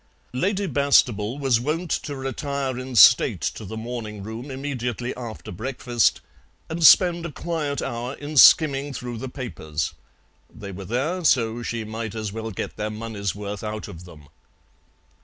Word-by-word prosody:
Lady 195 +9 0
Bastable 130 - +2
was 135 -5 +2
wont 155 +6 -2
to 145 - -2
retire 135 0 -3
in 130 0 -6
state 110 - +7
to - - -3
the 110 +4 -7
morning 110 -3 -6
room 110 +6 -7
immediately 125 -3 -4
after 120 -3 -8
breakfast 120 -1 0 0.5
and 165 +1 -2
spend 175 +1 +7
a 170 - -5
quiet 150 -2 -3
hour 120 +2 -4
in 145 +1 -7
skimming 145 -1 +6
through 120 -2 -6
the 130 - -5
papers; 80 - -4 0.6
they 100 -2 -9
were 95 +1 -8
there, 150 - -1
so 120 -5 +2
she 115 -1 -3
might 110 0 -5
as 110 -2 -4
well 110 0 -4
get 100 - -5
their 105 0 -2
money's 105 -3 -4
worth 105 0 -6
out 110 0 -5
of 85 +1 -10
them. 75 -5 -14
120 Hz, 160 wpm, -24 LUFS, 110-140 Hz, 0.6 s, state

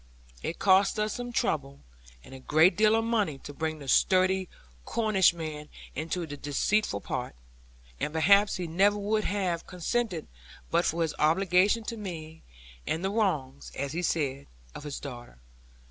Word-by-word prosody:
It 165 - -4
cost 195 +1 +4
us 210 0 0
some 245 0 -5
trouble 140 - -1 0.4
and - - -13
a 130 - -9
great 155 +7 +4
deal 215 +1 +4
of 225 - +1
money 210 -11 0
to 145 - -8
bring 155 +2 -3
the 140 -2 -10
sturdy 185 +5 +3 0.3
Cornishman 170 -9 +1 0.2
into 165 +3 -3
this 145 -2 -8
deceitful 145 - 0
part; - - -4 0.6
and 150 - -2
perhaps 200 +6 +4
he 180 - -3
never 195 +5 +2
would 210 +1 0
have 185 -4 -1
consented 180 0 -2 0.5
but 170 +1 +2
for 170 0 +1
his 160 - -2
obligation 185 +7 +3
to 230 +1 -5
me, 160 -6 -7 0.5
and 165 +4 -1
the 195 - 0
wrongs 155 -11 -1
(as 140 0 -3
he 170 +4 -2
said) 140 -5 -1 0.3
of 150 - -9
his 145 -1 -5
daughter. 120 - -9
175 Hz, 160 wpm, -28 LUFS, 150-205 Hz, 0.6 s, cost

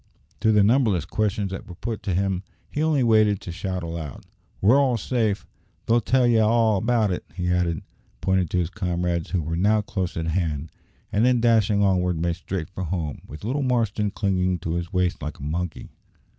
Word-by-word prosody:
To 110 +2 +3
the 105 -1 +5
numberless 110 -5 +3
questions 105 -2 -1
that 95 - -6
were 90 - -9
put 115 +3 -4
to 95 - -1
him 95 -1 0 0.3
he 150 - -2
only 155 -4 +2
waited 110 -3 +4
to 90 - -6
shout 95 +1 -4
aloud, 80 -4 -6 0.3
"We're 115 +8 +5
all 130 -4 +2
safe! 110 -2 -1 0.4
They'll 120 +1 +3
tell 130 +3 +3
ye 120 -2 +4
all 110 -1 +3
about 115 -2 +2
it," 90 - -3
he 90 -1 -1
added, 90 -2 0 0.4
pointing 95 +4 +1
to 90 - -2
his 90 -1 0
comrades, 90 -4 -1
who 90 -4 0
were 80 +2 -2
now 105 +5 +3
close 95 -4 -3
at 80 - -2
hand; 80 -3 -2 0.4
and 105 +1 +2
then, 125 0 +4
dashing 110 -3 +3
onward, 90 -3 +2
made 85 0 0
straight 90 -1 -5
for 95 0 -4
home, 80 -4 -3
with 75 - -10
little 130 +7 -1
Marston 115 -5 +1
clinging 95 -3 0
to 85 -1 -2
his 85 0 -3
waist 90 -1 0
like 75 0 -5
a - - -10
monkey. 85 +3 -4
95 Hz, 200 wpm, -24 LUFS, 85-110 Hz, 0.4 s, the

